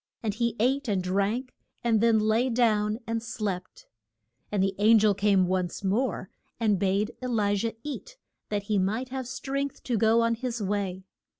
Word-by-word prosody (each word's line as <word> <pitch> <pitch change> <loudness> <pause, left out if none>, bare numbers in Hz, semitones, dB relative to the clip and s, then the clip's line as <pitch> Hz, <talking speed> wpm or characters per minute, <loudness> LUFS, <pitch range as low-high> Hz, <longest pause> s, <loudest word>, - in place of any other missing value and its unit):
And 215 -2 0
he 235 +1 -1
ate 265 +4 +1
and 195 -4 0
drank, 200 +7 -1 0.3
and 225 -3 +3
then 230 -1 +4
lay 220 +4 +2
down 215 -3 +2
and 230 0 -2
slept. 200 -5 -5 0.7
And 200 -2 +1
the 195 0 +1
an 220 +2 +6
gel 210 -1 +4
came 195 -1 +3
once 185 +1 -2
more, 200 0 -1 0.3
and 210 -4 +2
bade 200 +3 +1
E - - -1
li 210 -4 +1
jah 225 +3 -1
eat, 475 - -7 0.3
that 205 -1 -1
he 205 -1 0
might 220 +7 -1
have 260 -1 -4
strength 275 +1 -4
to 240 -4 0
go 225 +2 +4
on 230 0 +2
his 240 0 -3
way. 195 -2 -2
220 Hz, 180 wpm, -27 LUFS, 200-235 Hz, 0.7 s, an